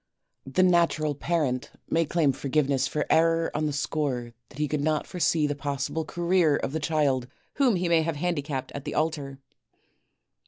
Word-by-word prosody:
The 135 +8 +2
natural 170 -4 +3
parent 145 -4 -1 0.2
may 165 0 +1
claim 155 -2 +2
forgiveness 135 0 0
for 150 - -2
error 165 0 +3
on 155 0 0
the - - -1
score 135 -4 -2 0.2
that - - -15
he 150 0 0
could 150 0 -1
not 155 0 0
foresee 165 -3 +1
the 145 - 0
possible 145 +2 -3
career 175 -2 +2
of 135 - -2
the 160 - -2
child 145 -5 +1 0.3
whom 265 -7 +4
he 180 0 0
may 170 -1 +4
have 165 0 -2
handicapped 145 -4 -2
at 140 - -6
the - - -5
altar. 150 -4 -1
150 Hz, 170 wpm, -26 LUFS, 140-165 Hz, 0.3 s, whom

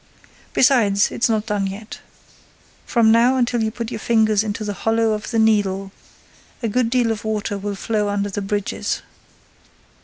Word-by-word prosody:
Besides, 220 -7 +3
it's 235 - 0
not 220 -1 0
done 205 -2 -1
yet. 205 +3 -8 0.9
From 230 -2 +4
now 235 +3 +4
until 240 -2 +1
you 220 - +1
put 230 +1 -6
your - - -4
finger 220 -1 +2
into 215 0 -3
the 205 -1 -3
hollow 225 +2 +1
of 215 0 -3
the 230 - -1
Needle, 200 -3 +1 0.7
a - - +1
good 230 +2 +1
deal 245 -2 +2
of 215 -2 -4
water 215 -1 -2
will 200 0 -4
flow 210 0 -1
under 205 0 -1
the 205 - -3
bridges. 205 0 -2
220 Hz, 165 wpm, -21 LUFS, 205-230 Hz, 0.9 s, From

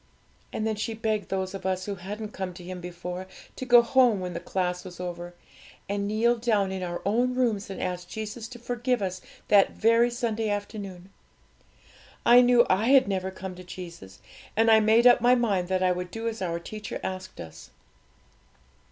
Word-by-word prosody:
And 220 - -3
then 220 -1 -1
she 220 +1 -3
begged 215 -3 -2
those 190 0 -2
of 195 -1 -7
us 185 0 -1
who 205 - -3
hadn't 205 +3 -6
come 185 -2 -5
to 180 - -10
Him 180 0 -7
before, 180 +1 -6 0.3
to 260 - -5
go 240 -1 +8
home 240 -4 +4
when 180 -1 -4
the - - -4
class 180 -1 -2
was 180 -2 -10
over, 175 -1 -6 0.5
and 200 +1 -2
kneel 230 +3 +2
down 215 -5 +1
in 190 -1 -4
our 175 -1 -4
own 245 +5 +1
rooms 225 -6 0
and 195 - -6
ask 180 -1 -3
Jesus 220 +2 -6
to 245 - -10
forgive 245 -1 -1
us 185 -1 -3 0.3
that 200 -2 +5
very 230 +2 +4
Sunday 225 -2 -2
afternoon. 200 -3 -5 1.1
I 245 +1 +8
knew 245 -1 +5
I 200 +5 +2
had 265 -2 +6
never 190 -1 -1
come 190 0 -7
to 180 0 -11
Jesus, 170 - -10 0.4
and 225 0 +5
I 220 - +7
made 220 +2 +4
up 245 -1 +7
my 245 +1 +5
mind 200 -7 0
that 185 0 0
I 185 - +3
would 180 0 -3
do 225 +4 -5
as 225 -2 -4
our 170 -2 -1
teacher 210 +4 -7
asked 185 - -6
us. 80 -1 -10
200 Hz, 195 wpm, -27 LUFS, 185-230 Hz, 1.1 s, go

